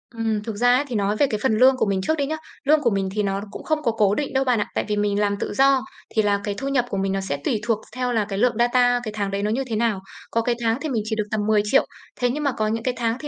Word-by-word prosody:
Ừm, 220 -2 -1
thực 220 -2 -5
ra 245 +3 +4
ấy 270 - +2
thì 245 - -4
nói 205 0 +1
về 285 - +3
cái 215 - -2
phần 220 -5 +2
lương 260 +2 +5
của - - +2
mình 195 -2 0
trước 315 +11 0
đi 280 - 0
nhá, 310 +3 -2 0.3
lương 300 +1 +4
của 240 - +3
mình 195 -2 -1
thì 210 - +1
nó 195 0 -1
cũng - - -8
không 310 -1 0
có 235 - +2
cố 210 -2 +2
định 285 -2 -3
đâu 265 0 +2
bạn 250 -4 +2
ạ, - - -1
tại - - 0
vì 210 - 0
mình 205 0 +1
làm 205 -1 +1
tự - - -3
do, 270 -1 +4 0.3
thì 220 - +4
là 205 -1 +1
cái 205 -1 -3
thu 275 - -4
nhập 270 -3 +1
của 195 - -3
mình 195 0 0
nó 195 - -1
sẽ 145 -7 -3
tùy 220 - +1
thuộc 230 -2 0
th - - -15
theo 250 -1 -1
là 220 -3 +1
cái 195 - -3
lượng 245 -1 +3
data 245 0 +3
cái 215 - -4
tháng 200 -2 -2
đấy 200 +1 -2
nó 210 - 0
như 260 +4 0
thế 225 - -2
nào. 215 -3 +1 0.3
Có 230 - +1
cái 240 +1 0
tháng 225 +1 +1
thì 310 - -3
mình 230 -4 0
chỉ 220 0 -2
được 210 -1 -2
tầm 215 - 0
10.000.000 215 +4 +3 0.4
thế 245 - +3
nhưng 295 +5 -2
mà 280 - +2
có 215 -3 -1
những 225 +1 -2
cái 255 - 0
tháng 230 0 0
thì, 295 - -6
225 Hz, 340 wpm, -23 LUFS, 210-255 Hz, 0.4 s, lương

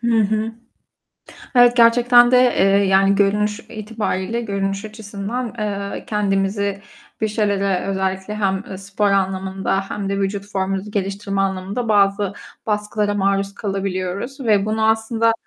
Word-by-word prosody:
Hı 235 -1 +2
hı. 215 +2 -1 1.0
Evet, 245 -1 +6
gerçekten 240 +1 +6
de, 255 - +5
eee, 245 -6 +3 0.2
yani 195 +1 +4
görünüş 210 +2 +1
itibariyle, 215 -1 -3
görünüş 200 -2 -2
açısından, 215 +2 -5
eee, 200 -1 -4
kendimizi 200 -2 -1 0.4
bir 220 - +1
şeylere 200 -3 0
özellikle 190 +1 -2
hem, 195 -1 -1
eee, 190 - -5
spor 200 +1 -1
anlamında 190 0 0
hem 200 -1 -3
de 200 0 -1
vücut 200 0 -2
formumuzu 195 +1 -2
geliştirme 200 0 -2
anlamında 195 +4 -2
bazı 200 -1 +2 0.3
baskılara 210 -1 -1
maruz 195 0 0
kalabiliyoruz 195 +5 -3
ve 210 -5 +2
bunu 220 0 +1
aslında, 225 +1 +2
200 Hz, 130 wpm, -20 LUFS, 195-220 Hz, 1.0 s, Evet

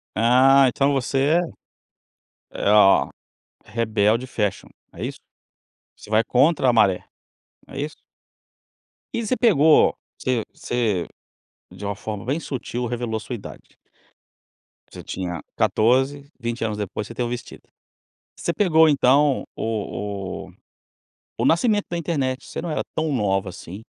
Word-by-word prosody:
Ah, 130 +4 +5
então 140 +3 +1
você 135 +3 +1 1.2
é - - -10
é - - +2
ó 105 -2 +6 0.6
rebelde 110 +2 +1
fashion, 105 -6 -2 0.3
é - - -7
isso? - - -5 0.8
Você - - -15
vai 110 +1 +3
contra 135 +1 +3
a - - +3
maré, 100 -5 +3 0.6
não - - -13
é 140 - -4
isso? 150 +1 -4 1.2
E 230 - -2
você 255 - +1
pegou 160 - +5 0.2
você 125 -3 0
você, 110 -8 -1 0.6
de 105 - -9
uma 100 - -2
forma 105 0 -6
bem 140 +6 -1
sutil, 125 -4 -4
revelou 120 -1 -2
a - - -4
sua 125 - -7
idade. 105 - -12 1.1
Você - - -11
tinha 90 -3 -5
14. 135 +5 +1
20 120 0 -3
anos 105 -2 -2
depois 105 0 -4
você 115 - -9
tem 120 - -2
o - - -3
vestido. 120 0 -7 0.8
Você 170 - -1
pegou 160 -6 +4
então 140 0 +3
o 100 -3 -4
o - - -16 0.8
o - - -1
nascimento 205 +5 +2
da 175 - -2
internet, 140 -6 -2
você - - -6
não 170 - -4
era 155 - -1
tão 155 -1 -1
nova 100 -6 0
assim. 95 +3 -9
125 Hz, 145 wpm, -23 LUFS, 105-145 Hz, 1.2 s, ó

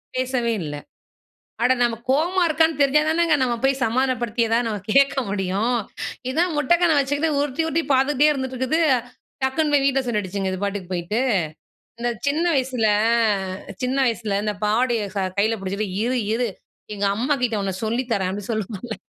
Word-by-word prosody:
பேசவே 255 -2 0
இல்லை. 145 -1 -5 0.8
அட 255 +1 +5
நம்ம 240 -1 +2
கோவமா 345 +7 +2
இருக்கான்னு 320 -1 +2
தெரிஞ்சா 280 +2 +4
தானங்க 325 -1 +3
நம்ம 245 -2 +1
போய் 270 0 +2
சமாதானப்படுத்தி 240 -1 0
எதாவது 230 +1 +1
நம்ம 210 -3 -3
கேட்க 275 0 +5
முடியும். 200 +4 0 0.6
இதான் 335 +5 +1
முட்ட 295 +3 -1
கண்ண 335 -2 +4
வச்சுக்கிட்டு, 290 +3 0
உருட்டி, 290 +2 -1
உருட்டி 325 +1 0
பார்த்துக்கிட்டே 285 +3 +3
இருந்துட்டு 260 -2 -3
இருக்குது, 260 +6 0 0.6
டக்குன்னு 295 +3 +1
போய் 280 -1 +4
வீட்டில 270 -1 +2
சொல்லிடிச்சுங்க, 200 -3 -2
இது 185 +1 -5
பாட்டுக்கு 200 -2 -3
போயிட்டு. 175 +6 -2 0.8
இந்த 240 0 0 0.2
சின்ன 305 +5 +1
வயசில 255 -4 0 1.0
சின்ன 255 +2 0
வயசில 220 -3 -1
இந்த 210 -1 -1
பாவடயை 225 0 +1
ச 200 - -2 0.2
கையில 220 +3 +2
பிடிச்சிட்டு, 200 +2 -3 0.2
"இரு 250 +1 0 0.2
இரு 245 +1 0 0.5
எங்க 200 0 -1
அம்மாகிட்ட 250 -4 0
உன்ன 190 -2 -2
சொல்லி 235 +4 -1
தரேன்" 190 -3 0
அப்படி 205 0 -6
சொல்லுவோம்ல. 220 +1 -4
250 Hz, 155 wpm, -22 LUFS, 210-275 Hz, 1.0 s, அட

